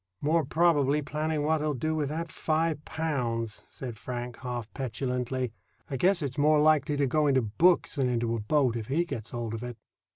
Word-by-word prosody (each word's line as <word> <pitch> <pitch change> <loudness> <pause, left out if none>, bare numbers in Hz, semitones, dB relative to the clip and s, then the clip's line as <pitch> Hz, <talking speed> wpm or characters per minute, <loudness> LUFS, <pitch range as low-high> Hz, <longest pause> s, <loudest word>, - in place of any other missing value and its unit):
"More 160 +3 +2
probably 150 -1 +3
planning 155 +1 -1
what 155 0 +2
he'll 150 -1 0
do 155 +6 -1
with 150 -3 -1
that 165 +2 -4
five 155 -1 0
pounds," 120 -9 -2
said 120 -4 -7
Frank, 120 -1 -5
half 120 -3 -4
petulantly. 125 -1 -2 0.4
"I 135 - -1
guess 180 +4 +3
it's 140 0 -3
more 150 +1 +5
likely 150 -1 +3
to 140 - +3
go 150 +3 +2
into 130 -3 +3
books 165 - +3
than 130 -2 +2
into 115 -1 0
a - - -2
boat 125 +2 +2
if 110 -2 -4
he 165 +6 +1
gets 115 -10 -5
hold 120 -2 -4
of 115 - -4
it." 120 -1 -6
140 Hz, 195 wpm, -28 LUFS, 120-155 Hz, 0.4 s, more